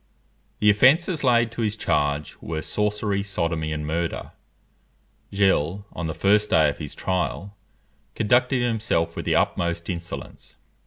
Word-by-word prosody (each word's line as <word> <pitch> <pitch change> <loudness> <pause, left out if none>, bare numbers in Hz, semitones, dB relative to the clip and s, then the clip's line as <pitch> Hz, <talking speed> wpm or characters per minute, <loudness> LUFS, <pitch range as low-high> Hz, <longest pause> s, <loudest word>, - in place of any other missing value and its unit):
The 105 0 +5
offences 145 - +3
laid 120 -3 +3
to 115 - -5
his 105 -1 0
charge 75 -7 -1
were, 80 -1 -4
sorcery, 105 -1 -1
sodomy, 85 -5 -2
and 75 -1 -3
murder. 80 +2 -3 1.0
Gilles, 100 -1 +1
on 85 - -4
the 80 - -4
first 105 +2 +3
day 80 -2 +4
of 70 - -6
his 75 -3 -7
trial, 95 +2 -2 0.6
conducted 120 +3 +2
himself 115 -8 0
with - - -5
the - - +1
utmost 85 +1 0
insolence. 85 -1 -8
100 Hz, 140 wpm, -24 LUFS, 80-110 Hz, 1.0 s, The